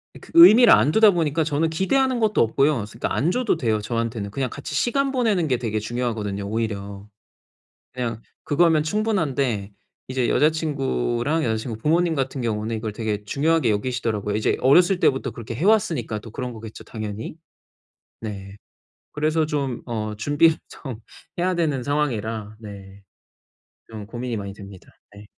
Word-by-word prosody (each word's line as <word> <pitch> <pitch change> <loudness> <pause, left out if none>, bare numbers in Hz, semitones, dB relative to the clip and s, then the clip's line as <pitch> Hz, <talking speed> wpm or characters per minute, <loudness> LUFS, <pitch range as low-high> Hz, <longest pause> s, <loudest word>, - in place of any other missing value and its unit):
어 - - -11
그 - - -15
의미를 250 -9 +9
안 115 +8 +4
두다 220 0 +6
보니까 160 -2 0
저는 160 +1 0
기대하는 255 +9 +1
것도 215 -2 +2
없고요. 125 0 +2
스 110 - -14
그러니까 - - -2
안 155 +6 +1
줘도 245 -7 0
돼요, 110 -5 0
저한테는. 115 -2 -3
그냥 130 +2 -2
같이 145 - -7
시간 275 +3 +1
보내는 215 - +1
게 125 -3 +1
되게 110 -3 -2
중요하거든요, 110 -3 -3
오히려. 100 -2 -4 0.9
그냥 115 -3 -4 0.2
그거면 155 0 +3
충분한데 140 - -1 0.4
이제 130 -2 -1
여자친구랑 145 - 0
여자친구 110 0 -2
부모님 165 +6 +1
같은 135 -1 -2
경우는 110 0 -2
이걸 110 -1 -4
되게 105 -2 -3
중요하게 150 +1 +1
여기시더라고요. 105 -2 -2
이제 110 - +1
어렸을 175 +8 +5
때부터 135 - +1
그렇게 115 0 -7
해 160 +10 -2
왔으니까 160 - +1
또 110 0 -12
그런 125 +1 -5
거겠죠, 110 -1 -10
당연히? 110 +4 -6 0.8
네. 100 -3 -7 0.6
그래서 155 +1 0
좀 140 -5 -2
어 110 -2 -3
준비를 145 +8 +3
좀 130 -7 -8 0.4
해야 180 +1 +1
되는 150 -6 0
상황이라 115 -7 -2
네. 100 -2 -11 0.9
좀 110 -2 -8
고민이 120 +1 -4
많이 100 -1 -5
됩니다. 100 -2 -13 0.3
네. 100 0 -13
125 Hz, 365 characters per minute, -23 LUFS, 110-160 Hz, 0.9 s, 의미를